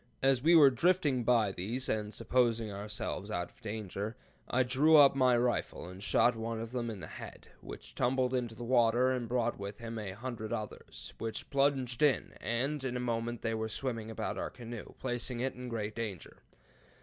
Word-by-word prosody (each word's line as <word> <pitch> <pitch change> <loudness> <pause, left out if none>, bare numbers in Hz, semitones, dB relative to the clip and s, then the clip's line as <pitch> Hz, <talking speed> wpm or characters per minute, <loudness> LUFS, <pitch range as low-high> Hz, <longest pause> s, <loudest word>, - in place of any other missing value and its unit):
As 135 -2 +4
we 165 +4 +6
were 145 -4 +8
drifting 150 -3 +2
by 115 -4 +3
these, 110 +8 -3
and 105 -1 -1
supposing 115 -1 +1
ourselves 100 0 -4
out 90 -3 -3
of - - -27
danger, 105 0 -4 0.3
I 130 +1 +3
drew 145 +6 +5
up 140 -2 +8
my 130 -2 +4
rifle 120 -6 -1
and 90 +1 -10
shot 120 +3 +3
one 115 0 -3
of 115 0 -5
them 120 -2 -2
in 105 -4 -6
the - - -4
head, - - -10
which - - -9
tumbled 130 - +1
into 120 -3 -1
the 120 - -7
water, 120 +1 +4
and 125 -3 -2
brought 120 -2 0
with 100 +1 -6
him 115 -1 -6
a 100 -3 -5
hundred 115 0 -5
others, 110 -3 -6
which 115 +2 -4
plunged 135 -2 +1
in, 145 -3 +3
and 130 +6 -1
in 125 -2 -2
a - - -3
moment 120 -1 -2
were 110 -1 -1
swimming 115 -2 -3
about 110 - -3
our - - -2
canoe, 120 -2 -8
and - - -16
placing 120 -1 -2
it 130 +1 -1
in 125 0 -7
great 110 -2 -3
danger. 105 -7 -5
120 Hz, 195 wpm, -32 LUFS, 110-130 Hz, 0.3 s, were